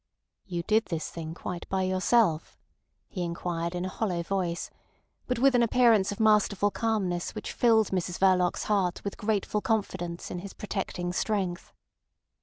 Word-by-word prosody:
"You 175 -3 -3
did 220 +5 +2
this 165 -2 -4
thing 165 -1 -6
quite 175 -1 -6
by 190 0 0
yourself?" 185 -2 +2 0.5
he 185 - -5
inquired 170 0 -3
in 175 +1 -2
a - - -2
hollow 185 -4 -2
voice, 175 -2 -2 0.6
but 250 - 0
with 270 +2 +4
an 245 - +4
appearance 230 -4 +4
of 205 - -6
masterful 210 -2 +3
calmness 195 -7 -1
which - - -5
filled 225 -3 +4
Mrs 180 -1 -1
Verloc's 185 -2 +3
heart 190 -4 0
with 200 - -4
grateful 210 0 -1
confidence 185 -6 -2
in 180 - -4
his 195 +2 -8
protecting 180 -4 -4
strength. 185 -3 -2
190 Hz, 155 wpm, -28 LUFS, 175-215 Hz, 0.6 s, with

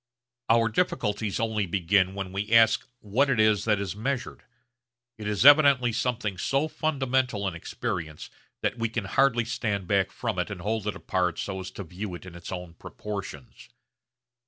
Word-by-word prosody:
Our 115 0 +4
difficulties 105 - -1
only 110 -3 0
begin 95 +1 +2
when 95 -2 -4
we 100 +3 -4
ask 115 -1 +5
what 125 +7 +1
it 125 -4 +1
is 110 -2 +3
that 105 -3 +2
is 100 -1 -4
measured. 125 +4 -3 0.8
It 105 - -5
is 105 +3 0
evidently 140 -4 +7
something 115 -5 -2
so 140 +3 +1
fundamental 130 -9 0
in 95 - -2
experience 85 -3 -5 0.3
that 120 - -1
we 115 0 0
can 110 -2 -3
hardly 120 +3 +2
stand 105 -4 -2
back 100 -1 +1
from - - -3
it - - -1
and 85 - -6
hold 105 +2 -2
it 105 - -1
apart 90 -2 -1
so 95 -1 -4
as 95 - -6
to 100 - -4
view 90 +2 -6
it 85 - -11
in 90 - -10
its 85 0 -9
own 90 -2 -6
proportions. 95 -7 -8
105 Hz, 175 wpm, -27 LUFS, 95-120 Hz, 0.8 s, evidently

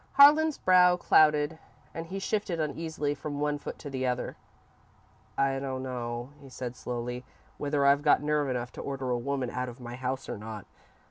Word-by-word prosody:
Harlan's 300 +2 +7
brow 180 -1 +5
clouded 150 -2 +4 0.3
and 165 0 -5
he 190 +3 -5
shifted 195 -3 -1
uneasily 155 -1 -2
from 145 0 -5
one 150 0 0
foot - - -7
to - - -9
the 130 -2 -2
other. 125 0 -2 1.0
"I 135 0 +2
don't 130 -1 -4
know," 120 0 -4
he 135 - -12
said, 125 -1 -6
slowly, 125 0 -4 0.4
"whether 145 -1 +1
I've 140 +1 +5
got 145 0 +4
nerve 150 -1 +1
enough 125 -1 -2
to - - -8
order 135 -2 -3
a 120 - +1
woman 130 -1 -2
out 125 0 -3
of 120 +2 -11
my 120 -1 -7
house 130 +1 -3
or - - -5
not. 105 -1 -7
140 Hz, 185 wpm, -29 LUFS, 125-150 Hz, 1.0 s, Harlan's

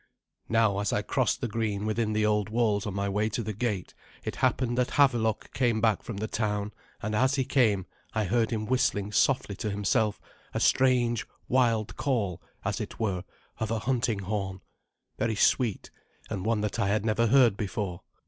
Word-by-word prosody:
Now, 110 -3 +3
as 105 -2 0
I - - 0
crossed - - 0
the - - 0
green 105 -2 -2
within 110 0 0
the 105 0 +2
old 105 -1 +1
walls 110 -3 +1
on 100 - -3
my 100 0 -1
way 105 +2 0
to 115 +2 -2
the 110 0 -3
gate, 105 -4 -2 0.3
it - - -4
happened 120 -2 +1
that 125 - 0
Havelok 120 -6 +2
came 120 -4 +1
back 110 -1 +2
from 115 - -6
the 110 +2 -2
town, 105 -2 -1 0.3
and 110 +1 -2
as 130 +4 +3
he 135 -2 0
came 105 -10 +2 0.3
I 110 - +2
heard 115 +3 +1
him 110 -2 -2
whistling 115 -5 +1
softly 105 0 +2
to 110 - -2
himself 105 +2 +1 0.4
a - - +1
strange 120 -3 +3 0.2
wild 115 -4 +1
call, 105 - -1 0.2
as - - -1
it - - -7
were, 95 -5 -1 0.4
of 110 - -1
a 115 - 0
hunting 115 -3 0
horn, 95 -2 -3 0.6
very 110 -1 0
sweet, 115 0 +1 0.4
and 100 -1 -3
one 115 -2 +1
that 105 -1 -2
I - - +2
had 105 +2 +1
never 115 +1 +2
heard 120 -3 +5
before. 95 -3 -3
110 Hz, 185 wpm, -28 LUFS, 105-120 Hz, 0.6 s, heard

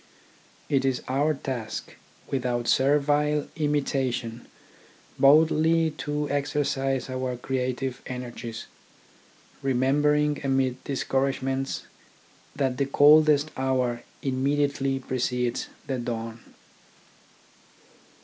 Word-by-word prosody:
It 135 -2 +1
is 130 -2 0
our 145 +4 +1
task, 130 -5 -5 0.3
without 125 -3 -1
servile 145 +2 +2
imitation, 135 -6 -1 0.7
boldly 160 +3 +5
to 150 0 -2
exercise 140 -2 0
our 130 -1 -3
creative 130 0 -2
energies, 120 -2 -6 1.0
remembering 145 +3 +2
amid 135 -2 0
discouragements 135 0 -1 0.7
that 135 -3 0
the 140 - 0
coldest 150 +1 +5
hour 130 -2 0 0.2
immediately 135 0 0
precedes 125 -1 -2 0.2
the 130 -2 -2
dawn. 115 -1 -4
135 Hz, 80 wpm, -26 LUFS, 125-145 Hz, 1.0 s, boldly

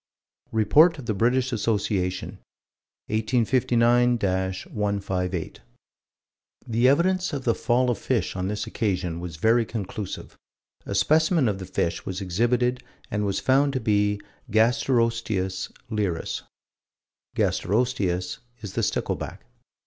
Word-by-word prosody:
Report 150 - +5
of 135 - -8
the 110 - 0
British 125 +5 +1
Association, 100 -4 -1 0.7
1859 120 +2 +3
158: 95 -2 -2 1.1
"The 120 +1 +3
evidence 185 +6 +2
of 140 -2 -3
the 115 - +2
fall 125 +1 +1
of 115 - -3
fish 115 -9 -1
on 90 0 -2
this 105 +1 -2
occasion 90 -6 -2
was 85 -2 -6
very 115 +8 +3
conclusive. 105 -3 -6 0.5
A - - -3
specimen 160 -2 +3
of 100 -3 -1
the 95 - -7
fish 90 -2 -1
was 95 0 -4
exhibited 120 +6 +1 0.3
and 105 0 0
was 100 - 0
found 140 +2 +3
to 130 - 0
be 105 -3 +2
the 100 - -17 0.3
Gasterosteus 115 -5 +1 0.2
leirus." 100 -6 -2 1.0
Gasterosteus 95 -5 0 0.2
is 105 -3 -7
the - - 0
stickleback. - - -2
110 Hz, 120 wpm, -25 LUFS, 95-125 Hz, 1.1 s, Report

